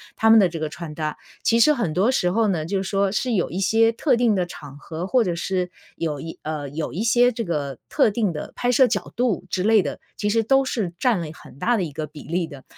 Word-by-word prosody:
他 225 Hz, -, +3 dB
们 225 Hz, 0 st, +8 dB
的 195 Hz, -, +5 dB
这 170 Hz, -1 st, -6 dB
个 155 Hz, -1 st, -2 dB
穿 155 Hz, 0 st, -8 dB
搭， 155 Hz, -1 st, -3 dB, 0.3 s
其 230 Hz, -, +3 dB
实 300 Hz, +6 st, +6 dB
很 235 Hz, -, -1 dB
多 205 Hz, +8 st, +3 dB
时 180 Hz, -9 st, +1 dB
候 225 Hz, +2 st, +2 dB
呢， 160 Hz, -5 st, -1 dB
就 195 Hz, 0 st, -1 dB
是 190 Hz, -, -5 dB
说 195 Hz, -1 st, +1 dB
是 245 Hz, +3 st, -1 dB
有 185 Hz, -5 st, +1 dB
一 180 Hz, -, -4 dB
些 225 Hz, +4 st, +3 dB
特 255 Hz, +3 st, +1 dB
定 235 Hz, -3 st, +2 dB
的 185 Hz, -2 st, +1 dB
场 145 Hz, -5 st, -11 dB
合， 165 Hz, +4 st, -6 dB
或 245 Hz, +3 st, +3 dB
者 180 Hz, -, -1 dB
是 180 Hz, +1 st, -2 dB, 0.2 s
有 155 Hz, -3 st, -3 dB
一 165 Hz, +2 st, -7 dB
呃， 150 Hz, -2 st, -4 dB
有 150 Hz, +2 st, -4 dB
一 185 Hz, -, -3 dB
些 245 Hz, +2 st, +4 dB
这 230 Hz, 0 st, -3 dB
个 145 Hz, -, -3 dB
特 270 Hz, -8 st, +3 dB
定 210 Hz, -4 st, 0 dB
的 150 Hz, -, -7 dB
拍 245 Hz, -, 0 dB
摄 255 Hz, +1 st, +5 dB
角 205 Hz, -6 st, -2 dB
度 235 Hz, -6 st, 0 dB
之 185 Hz, -, -1 dB
类 220 Hz, 0 st, +5 dB
的， 145 Hz, -, -5 dB, 0.2 s
其 210 Hz, -1 st, -1 dB
实 225 Hz, +1 st, +2 dB
都 270 Hz, +4 st, +3 dB
是 215 Hz, -9 st, -2 dB
占 245 Hz, -7 st, +2 dB
了 165 Hz, -, -4 dB
很 130 Hz, -, -15 dB
大 240 Hz, +8 st, +2 dB
的 210 Hz, -, 0 dB
一 160 Hz, -, -4 dB
个 155 Hz, +2 st, -4 dB
比 150 Hz, 0 st, -12 dB
例 170 Hz, +2 st, 0 dB
的。 140 Hz, -4 st, -11 dB
190 Hz, 285 characters per minute, -23 LUFS, 160-230 Hz, 0.3 s, 们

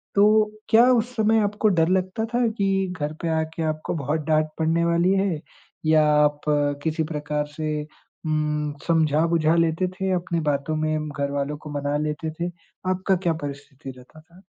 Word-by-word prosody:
तो 200 Hz, 0 st, +6 dB, 0.4 s
क्या 230 Hz, +2 st, +7 dB
उस 245 Hz, 0 st, +1 dB
समय 220 Hz, 0 st, +3 dB
आपको 205 Hz, +1 st, 0 dB
डर 160 Hz, -, +4 dB
लगता 185 Hz, +4 st, 0 dB
था 240 Hz, 0 st, +2 dB
कि 195 Hz, -1 st, +1 dB
घर 150 Hz, +1 st, -2 dB
पे 170 Hz, -, -2 dB
आके 160 Hz, +1 st, -3 dB
आपको 155 Hz, -1 st, -2 dB
बहुत 150 Hz, +1 st, -1 dB
डाँट 155 Hz, 0 st, +2 dB
पड़ने 165 Hz, +1 st, +1 dB
वाली 170 Hz, +2 st, +3 dB
है 195 Hz, -5 st, 0 dB, 0.5 s
या 155 Hz, -1 st, +5 dB
आप 150 Hz, 0 st, +3 dB, 0.4 s
किसी 160 Hz, 0 st, 0 dB
प्रकार 150 Hz, 0 st, -2 dB
से 155 Hz, -1 st, -2 dB, 0.4 s
उम, 150 Hz, -1 st, -1 dB
समझा-बुझा 160 Hz, 0 st, +3 dB
लेते 165 Hz, +2 st, +2 dB
थे 190 Hz, +1 st, -3 dB
अपने 175 Hz, -1 st, -1 dB
बातों 140 Hz, +2 st, -1 dB
में 155 Hz, 0 st, -1 dB
घरवालों 140 Hz, 0 st, -2 dB
को 150 Hz, +1 st, -10 dB
मना 145 Hz, +1 st, -1 dB
लेते 150 Hz, +1 st, -3 dB
थे? 170 Hz, +3 st, -3 dB, 0.4 s
आपका 185 Hz, +1 st, +1 dB
क्या 175 Hz, -2 st, 0 dB
परिस्थिति 140 Hz, -1 st, -7 dB
रहता 130 Hz, +5 st, -16 dB
था? 170 Hz, +4 st, -20 dB
160 Hz, 165 wpm, -24 LUFS, 150-185 Hz, 0.5 s, क्या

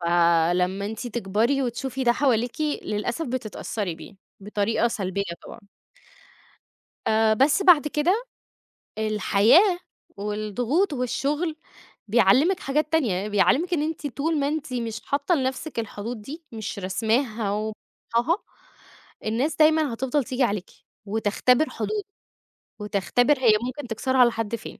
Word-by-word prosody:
فلمّا 175 Hz, +2 st, +2 dB
أنتِ 220 Hz, +3 st, -5 dB
تكبري 235 Hz, +4 st, 0 dB
وتشوفي 260 Hz, +2 st, -3 dB
ده 240 Hz, -, +5 dB
حواليكِ، 245 Hz, 0 st, 0 dB, 0.2 s
للأسف 235 Hz, +9 st, -3 dB
بتتأثري 215 Hz, -6 st, -4 dB
بيه 190 Hz, +5 st, -13 dB, 0.2 s
بطريقة 210 Hz, +3 st, 0 dB
سلبية 200 Hz, -4 st, -2 dB, 0.2 s
طبعًا. -, -, -10 dB, 1.5 s
آآ 220 Hz, 0 st, +3 dB
بس 280 Hz, -, +3 dB
بَعد 325 Hz, -5 st, +6 dB
كده، 360 Hz, -, +1 dB, 0.7 s
الحياة 220 Hz, -, +4 dB, 0.4 s
والضغوط 215 Hz, -, -1 dB
والشغل 290 Hz, +6 st, -1 dB, 0.5 s
بيعلّمِك 240 Hz, -, +4 dB
حاجات 300 Hz, +3 st, -1 dB
تانية، 210 Hz, -, +1 dB
بيعلّمِك 270 Hz, -, +2 dB
إن 300 Hz, -, +1 dB
أنتِ 310 Hz, -1 st, -3 dB
طول 295 Hz, +4 st, -1 dB
ما 280 Hz, -, +1 dB
أنتِ 300 Hz, -3 st, -3 dB
مش 230 Hz, -2 st, -3 dB
حاطة 280 Hz, +5 st, +1 dB
لنَفْسِك 265 Hz, 0 st, -2 dB
الحدود 220 Hz, +1 st, -5 dB
دي، 300 Hz, +10 st, -9 dB
مش 220 Hz, -3 st, -5 dB
رسماها 220 Hz, +3 st, 0 dB
وحطّاها. 230 Hz, -, -2 dB, 0.9 s
الناس 240 Hz, +8 st, 0 dB
دايمًا 310 Hz, -4 st, +4 dB
هَتِفضَل 265 Hz, +3 st, 0 dB
تيجي 255 Hz, +1 st, -1 dB
عليكِ 200 Hz, -5 st, -1 dB, 0.4 s
وتختبر 220 Hz, +7 st, +2 dB
حدودِك 420 Hz, -2 st, -3 dB, 0.7 s
وتختبر 225 Hz, +7 st, +1 dB
هي 235 Hz, -4 st, +5 dB
ممكن 255 Hz, +1 st, -5 dB
تكسرها 255 Hz, +3 st, +3 dB
لحد 225 Hz, -1 st, -1 dB
فين. -, -, -10 dB
240 Hz, 120 wpm, -24 LUFS, 210-290 Hz, 1.5 s, بَعد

